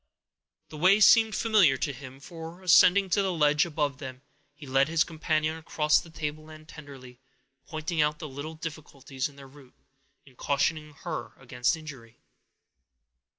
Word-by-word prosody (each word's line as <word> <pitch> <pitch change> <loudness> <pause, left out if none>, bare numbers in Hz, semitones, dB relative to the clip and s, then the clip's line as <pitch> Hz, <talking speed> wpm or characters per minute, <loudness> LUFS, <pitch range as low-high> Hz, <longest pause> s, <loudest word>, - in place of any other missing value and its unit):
The 155 - -10
way 190 +5 +5
seemed 220 0 +5
familiar 205 - +3
to 140 - -3
him; 130 0 -11
for, 165 +4 -10
ascending 185 +2 +5
to 200 - +3
the 190 -1 -1
ledge 150 -1 +2
above 145 -4 -2
them, 130 -2 -9 0.3
he 150 - -12
led 135 +1 +2
his 160 0 +2
companion 155 -1 -2
across 150 -1 +1
the 170 - -14
tableland 155 0 -7
tenderly, 135 -6 -13 0.5
pointing 160 +1 -2
out 150 0 +1
the 155 - -7
little 145 +3 -8
difficulties 145 -4 -6
in 140 - -19
their 140 -1 -13
route, 135 -1 -18 0.5
and 135 -2 -20
cautioning 150 +3 -1
her 170 -3 -5
against 125 +2 -1
injury. 130 -7 -12
150 Hz, 150 wpm, -27 LUFS, 140-165 Hz, 0.5 s, way